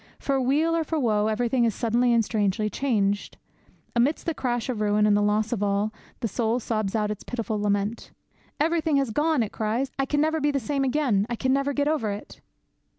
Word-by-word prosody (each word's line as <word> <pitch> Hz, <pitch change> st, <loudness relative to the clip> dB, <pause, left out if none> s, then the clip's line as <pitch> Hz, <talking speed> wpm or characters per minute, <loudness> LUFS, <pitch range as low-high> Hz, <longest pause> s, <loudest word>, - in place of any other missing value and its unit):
For 270 Hz, -1 st, 0 dB
weal 300 Hz, +6 st, +2 dB
or 330 Hz, -, +1 dB
for 315 Hz, 0 st, -2 dB
woe 215 Hz, -5 st, +2 dB
everything 235 Hz, +3 st, +1 dB
is 230 Hz, -3 st, +1 dB
suddenly 240 Hz, +2 st, +2 dB
and 230 Hz, -2 st, +3 dB
strangely 210 Hz, -1 st, 0 dB
changed. 205 Hz, -5 st, 0 dB, 0.6 s
Amidst 255 Hz, +6 st, +1 dB
the 330 Hz, -, 0 dB
crash 245 Hz, -5 st, -2 dB
of 240 Hz, -5 st, -3 dB
ruin 210 Hz, 0 st, +3 dB
and 210 Hz, -1 st, +4 dB
the 205 Hz, -, +3 dB
loss 210 Hz, +2 st, +1 dB
of 215 Hz, -, -3 dB
all, 205 Hz, +1 st, 0 dB, 0.3 s
the 230 Hz, -, 0 dB
soul 225 Hz, +3 st, 0 dB
sobs 215 Hz, -3 st, -2 dB
out 210 Hz, -1 st, 0 dB
its 210 Hz, -, -6 dB
pitiful 225 Hz, -3 st, -3 dB
lament. 205 Hz, +2 st, -1 dB, 0.5 s
'Everything 320 Hz, 0 st, +1 dB
has 270 Hz, -4 st, 0 dB
gone!' 300 Hz, +1 st, +2 dB
it 210 Hz, -, -5 dB
cries. 225 Hz, +5 st, -1 dB
'I 270 Hz, -, +2 dB
can 290 Hz, -, 0 dB
never 315 Hz, +1 st, +1 dB
be 295 Hz, -, +2 dB
the 280 Hz, -1 st, 0 dB
same 275 Hz, +3 st, -1 dB
again! 255 Hz, -7 st, +1 dB
I 240 Hz, -, -1 dB
can 260 Hz, +3 st, +1 dB
never 275 Hz, +1 st, +1 dB
get 285 Hz, +1 st, 0 dB
over 295 Hz, -8 st, 0 dB
it!' 205 Hz, +1 st, -7 dB
235 Hz, 215 wpm, -25 LUFS, 210-275 Hz, 0.6 s, and